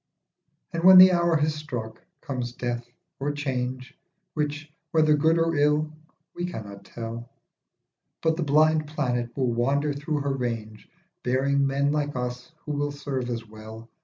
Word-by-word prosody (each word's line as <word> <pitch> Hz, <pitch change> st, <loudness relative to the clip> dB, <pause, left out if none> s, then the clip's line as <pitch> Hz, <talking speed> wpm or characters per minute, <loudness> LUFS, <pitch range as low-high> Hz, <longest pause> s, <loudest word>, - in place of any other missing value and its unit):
And 165 Hz, 0 st, -2 dB
when 185 Hz, 0 st, +10 dB
the 185 Hz, 0 st, +10 dB
hour 170 Hz, -1 st, +2 dB
has 150 Hz, 0 st, +1 dB
struck, 120 Hz, -7 st, -6 dB, 0.2 s
comes 125 Hz, -3 st, -4 dB
death 120 Hz, -1 st, -3 dB, 0.4 s
or 140 Hz, +2 st, -1 dB
change, 130 Hz, -3 st, -3 dB, 0.4 s
Which, 150 Hz, 0 st, -3 dB, 0.2 s
whether 155 Hz, -1 st, +4 dB
good 160 Hz, +3 st, +3 dB
or 165 Hz, 0 st, +2 dB
ill 150 Hz, +1 st, +2 dB, 0.4 s
we 175 Hz, 0 st, -3 dB
cannot 100 Hz, -, -8 dB
tell, 115 Hz, +1 st, -7 dB, 0.9 s
But 160 Hz, 0 st, +2 dB
the 170 Hz, -, -3 dB
blind 155 Hz, +1 st, +3 dB
planet 125 Hz, -6 st, -1 dB
will 125 Hz, -3 st, +1 dB
wander 140 Hz, +5 st, +1 dB
through 150 Hz, +1 st, -2 dB
her 140 Hz, -1 st, -1 dB
range 115 Hz, -4 st, -4 dB, 0.3 s
Bearing 140 Hz, +2 st, +1 dB
men 140 Hz, +1 st, +1 dB
like 145 Hz, -1 st, -1 dB
us 125 Hz, +2 st, -4 dB
who 150 Hz, -, -3 dB
will 145 Hz, 0 st, -1 dB
serve 140 Hz, -3 st, -4 dB
as 115 Hz, -1 st, -4 dB
well. 110 Hz, +1 st, -11 dB
140 Hz, 155 wpm, -26 LUFS, 120-150 Hz, 0.9 s, when